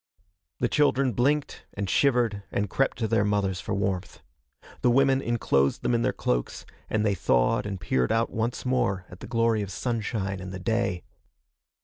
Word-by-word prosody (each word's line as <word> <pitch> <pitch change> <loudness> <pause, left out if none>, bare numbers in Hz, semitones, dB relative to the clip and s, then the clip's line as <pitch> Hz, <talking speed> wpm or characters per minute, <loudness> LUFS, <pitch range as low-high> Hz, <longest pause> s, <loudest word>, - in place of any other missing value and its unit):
The 120 - +2
children 140 -2 +2
blinked 140 +6 0
and 100 -1 -2
shivered 120 -3 +2
and 100 -1 -1
crept 135 - +1
to 115 - -1
their 115 -2 +2
mothers 100 -2 0
for - - -3
warmth. 95 -2 -3 0.6
The 125 - +4
women 135 +2 +4
enclosed 105 - +1
them - - +1
in 115 - +2
their - - +2
cloaks, - - -2 0.2
and 110 0 0
they 100 - +2
thawed 60 -1 +1
and 100 -2 -4
peered 65 -7 0
out 115 +1 +1
once 115 +3 -2
more 95 -7 0
at 90 - -11
the - - -9
glory 115 -2 +1
of 100 - -4
sunshine 105 -5 -2
and 95 0 -7
the 95 - -5
day. 100 -3 -1
110 Hz, 175 wpm, -26 LUFS, 95-120 Hz, 0.6 s, The